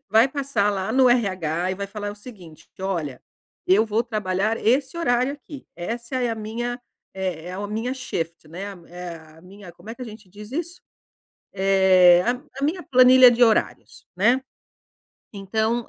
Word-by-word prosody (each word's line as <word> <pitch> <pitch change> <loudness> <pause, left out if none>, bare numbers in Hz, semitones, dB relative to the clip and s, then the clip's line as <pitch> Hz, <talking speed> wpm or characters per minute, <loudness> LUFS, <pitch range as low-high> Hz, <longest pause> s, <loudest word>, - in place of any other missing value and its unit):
vai 220 +4 +5
passar 265 -7 0
lá 195 +1 -3
no 260 -1 +5
RH 185 -6 0
e - - -3
vai 200 +1 -5
falar 205 0 -5
o - - -8
seguinte, 195 - -14
que: - - -12
"Olha, 165 -9 -3 0.5
eu 200 +4 +4
vou 220 +2 0
trabalhar 215 -1 -1
esse 265 +6 +1
horário 255 -4 +1
aqui. 285 0 -12
Essa 235 +8 -5
é 245 -2 0
a - - -2
minha 240 +3 -4 0.3
é 180 -3 -4
é 185 - -6
o 205 - -4
minha 225 +5 -3
shift, 165 -11 -5
né, 175 +4 -8 0.3
é 175 -1 -7
a 160 0 -17
minha", 190 -1 -13
como 210 +6 -12
é - - -6
que 255 - -20
a - - -4
gente 215 -3 -12
diz 210 +2 -12
isso? 340 +3 -5 0.7
Eh, 190 -2 +5
"A 255 +3 -4
a - - -1
minha 335 +5 0
planilha 255 0 +7
de 240 +1 +3
horários, 225 -2 0
né. 240 +8 +3 0.9
Então, 220 +4 -2
215 Hz, 180 wpm, -23 LUFS, 185-245 Hz, 0.9 s, planilha